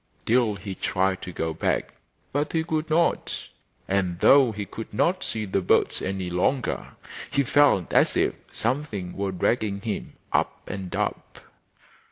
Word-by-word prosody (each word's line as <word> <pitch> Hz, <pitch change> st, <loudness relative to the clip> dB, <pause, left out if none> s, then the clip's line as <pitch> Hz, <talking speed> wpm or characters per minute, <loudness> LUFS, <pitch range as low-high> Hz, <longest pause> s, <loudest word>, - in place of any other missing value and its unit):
Sill 115 Hz, -2 st, +3 dB
he 100 Hz, 0 st, -6 dB
tried 95 Hz, 0 st, 0 dB
to 90 Hz, -, -6 dB
go 80 Hz, -1 st, -2 dB
back, -, -, -1 dB, 0.4 s
but 145 Hz, +2 st, -1 dB
he 160 Hz, -1 st, +2 dB
could 160 Hz, -1 st, -2 dB
not, 165 Hz, +2 st, +2 dB, 0.5 s
and 95 Hz, -3 st, 0 dB
though 135 Hz, -4 st, +6 dB
he 105 Hz, -1 st, -5 dB
could 110 Hz, +3 st, -8 dB
not 175 Hz, +7 st, +1 dB
see 110 Hz, -1 st, -2 dB
the 95 Hz, 0 st, 0 dB
birds 90 Hz, -, +2 dB
any 95 Hz, -1 st, -2 dB
longer 100 Hz, +9 st, -1 dB, 0.4 s
he 140 Hz, -, +2 dB
felt 140 Hz, -, +3 dB
as -, -, +4 dB
if -, -, +2 dB, 0.2 s
something 115 Hz, -8 st, -2 dB
were 100 Hz, -1 st, -1 dB
dragging 100 Hz, +2 st, 0 dB
him 110 Hz, -1 st, -4 dB, 0.2 s
up -, -, 0 dB
and 95 Hz, -2 st, -5 dB
up. -, -, -3 dB
105 Hz, 155 wpm, -25 LUFS, 95-140 Hz, 0.5 s, though